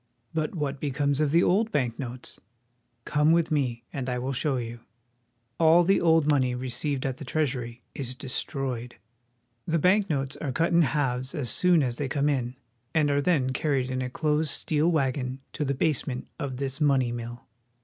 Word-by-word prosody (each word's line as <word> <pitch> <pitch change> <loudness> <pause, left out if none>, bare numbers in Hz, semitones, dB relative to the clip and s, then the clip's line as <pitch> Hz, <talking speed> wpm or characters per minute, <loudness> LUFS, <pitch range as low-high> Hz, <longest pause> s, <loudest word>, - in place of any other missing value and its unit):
But 155 +2 -1
what 145 -3 -2
becomes 140 0 0
of 150 - +2
the 170 +4 +4
old 220 +5 +2
bank 125 - 0
notes? 125 -2 -6 0.7
Come 150 +1 +3
with 165 -1 +2
me, 125 -6 0
and 130 -2 -3
I 125 - -1
will 130 +2 -2
show 135 +1 0
you. 120 -1 -5 0.8
All 165 +1 +6
the 195 +3 +3
old 165 -2 +5
money 130 -4 +3
42 - - -4
WASHINGTON. - - -6
received 130 +2 -2
at 130 -1 -2
the - - -8
Treasury 125 -5 -2
is 130 -2 -4
destroyed. 130 -2 -3 0.7
The 165 - +2
bank 190 +5 +3
notes 135 -3 -1
are 140 - -3
cut 165 +6 +1
in 170 - +6
halves 130 -1 0
as 140 -6 -1
soon 175 -4 +4
as 120 -2 -2
they 140 -2 -2
come 145 +2 +1
in, 125 -3 -1 0.4
and 150 -2 +3
are 145 0 +2
then 140 -6 +2
carried 135 -3 0
in 130 0 -1
a 125 - -2
closed 150 +3 0
steel 155 +4 +1
wagon 135 -3 -1
to 155 - -2
the 140 -1 -1
basement 130 -3 -1
of 130 -3 -3
this 135 +2 -3
money 135 -5 +3
mill. 120 0 -6
140 Hz, 190 wpm, -27 LUFS, 125-155 Hz, 0.8 s, All